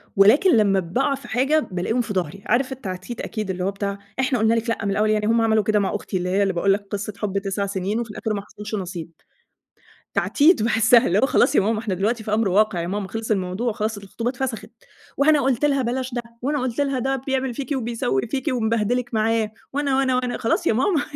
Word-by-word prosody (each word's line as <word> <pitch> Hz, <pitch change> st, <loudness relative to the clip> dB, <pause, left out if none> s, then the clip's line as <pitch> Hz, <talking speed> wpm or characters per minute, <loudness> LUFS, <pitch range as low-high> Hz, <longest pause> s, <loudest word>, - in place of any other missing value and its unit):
ولكن 235 Hz, -, +6 dB
لمّا 200 Hz, -2 st, +3 dB
باقع 195 Hz, +11 st, 0 dB
في 275 Hz, -, -12 dB
حاجة 270 Hz, +6 st, +2 dB
بالاقيهم 185 Hz, +7 st, 0 dB
في 225 Hz, -3 st, -4 dB
ضهري. 185 Hz, +1 st, -3 dB
عارف 255 Hz, +4 st, +1 dB
التعديد 215 Hz, -2 st, -6 dB
أكيد 215 Hz, -3 st, -4 dB
اللي 180 Hz, -1 st, -2 dB
هو 195 Hz, -, 0 dB
بتاع 200 Hz, 0 st, -3 dB, 0.2 s
إحنا 260 Hz, -2 st, +1 dB
قُلنا 220 Hz, +1 st, +3 dB
لِك 230 Hz, +1 st, -1 dB
لأ 225 Hz, -3 st, -2 dB
من 200 Hz, -, 0 dB
الأول 210 Hz, +2 st, +1 dB
يعني 215 Hz, -1 st, +1 dB
هُم 230 Hz, +1 st, +3 dB
عملوا 220 Hz, -1 st, +3 dB
كده 215 Hz, 0 st, +2 dB
مع 200 Hz, 0 st, -1 dB
أختي 195 Hz, -2 st, -3 dB
اللي 180 Hz, 0 st, -2 dB
هي 195 Hz, +2 st, +2 dB
اللي 195 Hz, -2 st, 0 dB
باقول 195 Hz, +3 st, +2 dB
لك 200 Hz, 0 st, -4 dB
قصة 205 Hz, +1 st, -3 dB
حُب 200 Hz, -2 st, -2 dB
9 200 Hz, 0 st, -2 dB
سنين 200 Hz, +2 st, -2 dB
وفي 235 Hz, -2 st, -4 dB
الآخر 220 Hz, +1 st, -3 dB
ما 200 Hz, -, -2 dB
حصلش 210 Hz, +1 st, -7 dB
نصيب 175 Hz, -4 st, -5 dB, 1.0 s
تعديد 305 Hz, -, +3 dB
باحسها 225 Hz, +1 st, +4 dB
اللي 185 Hz, +4 st, +2 dB
هو 265 Hz, -, +4 dB
خلاص 275 Hz, +1 st, +3 dB
يا -, -, +5 dB
ماما 215 Hz, +2 st, 0 dB
إحنا 215 Hz, -3 st, -3 dB
دلوقتي 215 Hz, +5 st, -1 dB
في 215 Hz, -, -3 dB
أمر 220 Hz, 0 st, +2 dB
واقع 195 Hz, -2 st, +2 dB
يا 170 Hz, -, -3 dB
ماما 200 Hz, +1 st, -3 dB
خلِص 225 Hz, +3 st, -4 dB
الموضوع 195 Hz, +4 st, -1 dB
خلاص 215 Hz, -1 st, -2 dB
الخطوبة 205 Hz, +4 st, -4 dB
اتفسخِت 250 Hz, -2 st, -4 dB, 0.5 s
وأنا 295 Hz, +1 st, +4 dB
قُلت 270 Hz, +1 st, +1 dB
لها 275 Hz, -2 st, +2 dB
بلاش 255 Hz, +1 st, -2 dB
ده 240 Hz, -, -1 dB, 0.2 s
وأنا 285 Hz, +3 st, 0 dB
قُلت 255 Hz, +2 st, -1 dB
لها 275 Hz, -2 st, 0 dB
ده 270 Hz, +2 st, 0 dB
بيعمل 265 Hz, -1 st, 0 dB
فيكِ 270 Hz, +3 st, -6 dB
وبيسوي 230 Hz, -, -1 dB
فيكِ 265 Hz, +4 st, -3 dB
ومبهدلِك 230 Hz, +1 st, 0 dB
معاه 220 Hz, 0 st, +1 dB, 0.2 s
وأنا 280 Hz, -2 st, 0 dB
وأنا 260 Hz, -2 st, +2 dB
وأنا 250 Hz, -1 st, -1 dB
خلاص 225 Hz, -, 0 dB
يا -, -, +4 dB
ماما 290 Hz, -, +2 dB
220 Hz, 225 wpm, -22 LUFS, 200-250 Hz, 1.0 s, ولكن